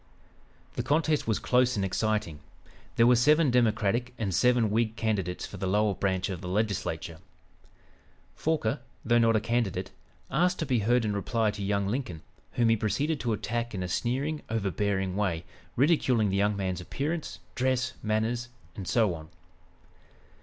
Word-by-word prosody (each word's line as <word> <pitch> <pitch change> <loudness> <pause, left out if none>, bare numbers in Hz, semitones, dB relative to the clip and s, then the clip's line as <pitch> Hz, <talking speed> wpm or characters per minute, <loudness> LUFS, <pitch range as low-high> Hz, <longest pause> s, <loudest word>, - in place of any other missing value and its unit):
The - - +1
contest 155 -1 +1
was 110 - +2
close 125 0 +2
and 100 -2 0
exciting. 95 -5 -1 0.6
There 115 - +5
were 125 +1 +6
seven 150 +4 +4
Democratic 120 0 +1
and 100 -4 -2
seven 120 +1 +3
Whig 110 0 +1
candidates 100 -6 -1
for - - -9
the 95 - -3
lower 105 +2 +2
branch 95 -1 -1
of 90 -3 -5
the 90 - -6
Legislature. 90 -5 -2 1.2
Forquer, 150 -5 0 0.3
though 120 0 +4
not 115 -1 +4
a - - +4
candidate, 105 -5 -1 0.4
asked 180 +1 +2
to 160 - -2
be 130 -4 +1
heard 120 +3 +2
in 105 - 0
reply 110 +2 0
to 105 -1 -6
young 100 0 0
Lincoln, 100 - -3 0.3
whom 120 -2 +2
he 115 - +5
proceeded 140 +8 -1
to 115 -2 -1
attack 115 +1 -3
in 95 - -3
a - - -3
sneering 135 - -1
overbearing 100 -3 -1
way, 90 -5 -1 0.3
ridiculing 130 -6 +3
the 95 - -1
young 100 +1 +2
man's 95 -2 -2
appearance, 150 - -3 0.2
dress, 130 0 0
manners 110 +3 -1 0.3
and 95 -3 -7
so 110 -6 +2
on. 80 -1 -9
110 Hz, 160 wpm, -28 LUFS, 100-125 Hz, 1.2 s, were